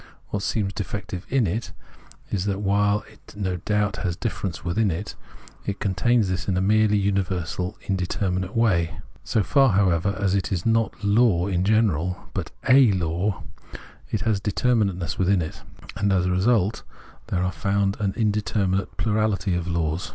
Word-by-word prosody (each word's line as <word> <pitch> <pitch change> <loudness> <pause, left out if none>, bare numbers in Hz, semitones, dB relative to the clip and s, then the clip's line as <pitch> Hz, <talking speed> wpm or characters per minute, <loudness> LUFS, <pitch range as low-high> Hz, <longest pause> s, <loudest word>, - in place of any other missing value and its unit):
What 100 - -2
seems 100 -1 -1
defective 100 -3 -5
in 130 -3 +2
it 105 +7 -3 0.6
is 95 -2 -1
that 100 0 -1
while 100 +1 +2
it 105 - -18
no 95 -3 -1
doubt 105 +3 0
has 90 -3 -2
difference 95 -5 -4
within 100 +4 +1
it, 95 +5 -4 0.5
it 100 0 -2
contains 105 +3 +2
this 95 0 -3
in 95 -2 +1
a - - +2
merely 105 +2 +3
universal 95 -1 -1
indeterminate 95 0 -1
way. 85 -8 +2 0.3
So 110 - +1
far, 135 0 +4
however, 95 0 +2
as 95 -2 +1
it 95 -1 0
is 90 -3 -2
not 115 -1 +1
law 100 -4 +3
in 90 -2 0
general, 95 -5 +1
but - - -3 0.2
a 130 -3 +7
law, 90 +3 -1 0.7
it 105 - -2
has 105 +1 +1
determinate 105 -1 +1
ness 85 -4 -4
within 95 0 +3
it; 80 -2 -5 0.3
and 100 0 +1
as 90 -2 +2
a 90 - +1
result 100 +2 +2 0.5
there 90 -1 0
are 90 - 0
found 100 +5 0
an 100 -3 -1
indeterminate 105 -3 0
plurahty 105 -4 +1
of 90 0 -3
laws. 85 -1 -1
100 Hz, 165 wpm, -24 LUFS, 90-105 Hz, 0.7 s, a